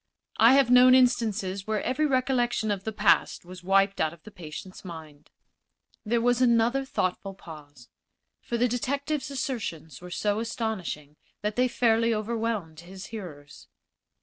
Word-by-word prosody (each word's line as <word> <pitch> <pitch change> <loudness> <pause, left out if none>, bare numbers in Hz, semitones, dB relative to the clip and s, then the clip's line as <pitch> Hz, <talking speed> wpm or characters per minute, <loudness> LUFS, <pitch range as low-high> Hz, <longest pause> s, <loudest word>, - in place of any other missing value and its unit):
I 230 +3 +7
have 270 -3 +4
known 250 +1 +7
instances 220 -6 +1
where 215 -1 -1
every 300 +4 0
recollection 250 -4 0
of 195 -1 -3
the 220 - -2
past 210 -4 +2
was 180 +1 -11
wiped 195 +1 +2
out 155 0 0
of 170 - -18
the 215 - -12
patient's 180 +1 -10
mind." 160 -5 -11 0.7
There 230 +2 0
was 245 +1 +1
another 240 +2 +3
thoughtful 195 -4 -3
pause, 145 -8 -13 0.5
for 235 - -3
the 245 +2 +2
detective's 280 +5 -2
assertions 230 - -5
were 180 - -9
so 205 +4 -1
astonishing 215 - -4 0.3
that 210 0 -2
they 250 +1 +3
fairly 230 -1 +2
overwhelmed 215 -7 -3
his 185 +3 -10
hearers. 150 -9 -10
215 Hz, 150 wpm, -27 LUFS, 180-245 Hz, 0.7 s, I